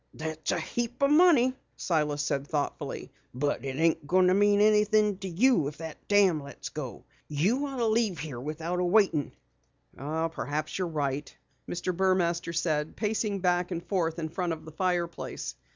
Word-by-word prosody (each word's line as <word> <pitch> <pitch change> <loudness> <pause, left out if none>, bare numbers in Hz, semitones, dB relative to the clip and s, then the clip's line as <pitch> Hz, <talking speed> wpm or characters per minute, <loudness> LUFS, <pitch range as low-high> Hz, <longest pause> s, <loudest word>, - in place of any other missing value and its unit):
"That's 160 0 -5
a - - 0
heap 240 +3 -3
o' - - +6
money," 295 -5 +5 0.2
Silas 150 -4 0
said 140 0 -1
thoughtfully. 145 -2 -3 0.2
"But 145 +2 -1
it 135 -1 -4
ain't 160 -1 +1
going 185 +2 +4
to - - +4
mean 205 +1 +4
anything 210 -1 +4
to 195 - -5
you 185 - +3
if 145 - -7
that 160 -1 -9
dam 195 -6 +4
lets 140 0 -8
go. 135 -6 -7 0.2
You 205 - +1
ought 270 -1 -6
to 235 - +1
leave 220 -4 +1
here 150 -5 -6
without 160 +6 -3
waitin'." 180 - +2 0.6
"Perhaps 155 +2 -3
you're 185 - 0
right," 145 -3 -2 0.4
Mr. 175 +1 -2
Burmaster 175 -2 +1
said, 155 -2 -1
pacing 210 -2 -1
back 180 -1 +1
and 175 -1 -4
forth 170 -3 -1
in 160 -2 -3
front 175 0 -2
of 160 -1 -9
the 160 - -9
fireplace. 175 0 -2
170 Hz, 170 wpm, -28 LUFS, 155-205 Hz, 0.6 s, o